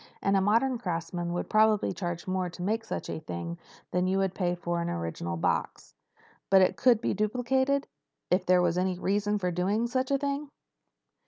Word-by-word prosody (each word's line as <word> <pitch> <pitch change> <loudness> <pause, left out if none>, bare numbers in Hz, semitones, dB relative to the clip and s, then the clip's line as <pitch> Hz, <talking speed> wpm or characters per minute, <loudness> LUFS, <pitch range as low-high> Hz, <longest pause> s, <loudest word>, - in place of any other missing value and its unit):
And 195 - +1
a 195 - +4
modern 230 +5 +2
craftsman 170 -2 -3
would 175 - -2
probably 215 -2 +3
charge 175 -1 -4
more 185 -1 -1
to 175 +1 -8
make 220 +4 0
such 225 - -5
a - - -4
thing 85 - -6 0.3
than 180 0 +1
you 190 +1 +1
would 195 -1 +1
pay 180 -2 0
for 175 0 -2
an 170 - -2
original 85 - -3
box." - - -2 0.6
"But 190 -1 +7
it - - +2
could 240 -4 +4
be - - 0
duplicated—if 250 -1 -1
there 180 0 +4
was 175 0 +1
any 185 -1 0
reason 205 +3 0
for 180 -3 -1
doing 195 +6 0
such 255 +2 -1
a 275 - +3
thing?" 280 +1 -3
190 Hz, 185 wpm, -28 LUFS, 175-220 Hz, 0.6 s, But